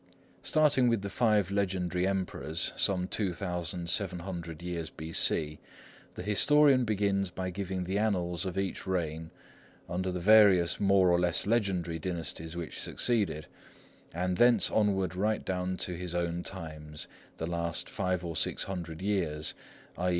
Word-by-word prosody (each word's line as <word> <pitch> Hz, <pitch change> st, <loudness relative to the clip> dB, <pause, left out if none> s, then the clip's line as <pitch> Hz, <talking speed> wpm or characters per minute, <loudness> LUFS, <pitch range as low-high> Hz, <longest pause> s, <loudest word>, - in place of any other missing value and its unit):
Starting 145 Hz, -5 st, +3 dB
with 115 Hz, -4 st, +1 dB
the 100 Hz, -, -4 dB
five 105 Hz, -5 st, +2 dB
legendary 90 Hz, -2 st, 0 dB
Emperors, 90 Hz, -4 st, -2 dB
some 90 Hz, -2 st, +2 dB
2700 90 Hz, -2 st, -2 dB
years 85 Hz, -2 st, -4 dB
B.C., 80 Hz, -1 st, 0 dB, 0.6 s
the -, -, -6 dB
historian 135 Hz, +6 st, +4 dB
begins 100 Hz, -3 st, 0 dB
by 95 Hz, 0 st, -4 dB
giving 95 Hz, 0 st, -3 dB
the 95 Hz, +3 st, -1 dB
annals 90 Hz, -5 st, 0 dB
of 95 Hz, -1 st, -4 dB
each 95 Hz, 0 st, -3 dB
reign 80 Hz, -3 st, -2 dB, 0.6 s
under 90 Hz, +2 st, -2 dB
the 90 Hz, -, -3 dB
various 100 Hz, -3 st, +5 dB
more 95 Hz, -2 st, +4 dB
or 85 Hz, -, +3 dB
less 90 Hz, -1 st, +1 dB
legendary 95 Hz, -7 st, 0 dB
dynasties 80 Hz, -1 st, -4 dB
which 85 Hz, -3 st, -5 dB
succeeded, 105 Hz, -11 st, 0 dB, 0.7 s
and 90 Hz, +1 st, -2 dB
thence 120 Hz, 0 st, +5 dB
onward 95 Hz, -4 st, +1 dB
right 105 Hz, +3 st, 0 dB
down 90 Hz, 0 st, -2 dB
to 90 Hz, -, -1 dB
his 90 Hz, 0 st, -5 dB
own 85 Hz, 0 st, -1 dB
times, 75 Hz, -5 st, -6 dB, 0.3 s
the 80 Hz, -, -3 dB
last 85 Hz, -1 st, -2 dB
five 90 Hz, -2 st, -2 dB
or 85 Hz, -1 st, -4 dB
six -, -, +1 dB
hundred 85 Hz, -3 st, -6 dB
years, 85 Hz, -7 st, -1 dB, 0.5 s
_i. 90 Hz, +1 st, +1 dB
90 Hz, 140 wpm, -30 LUFS, 85-100 Hz, 0.7 s, various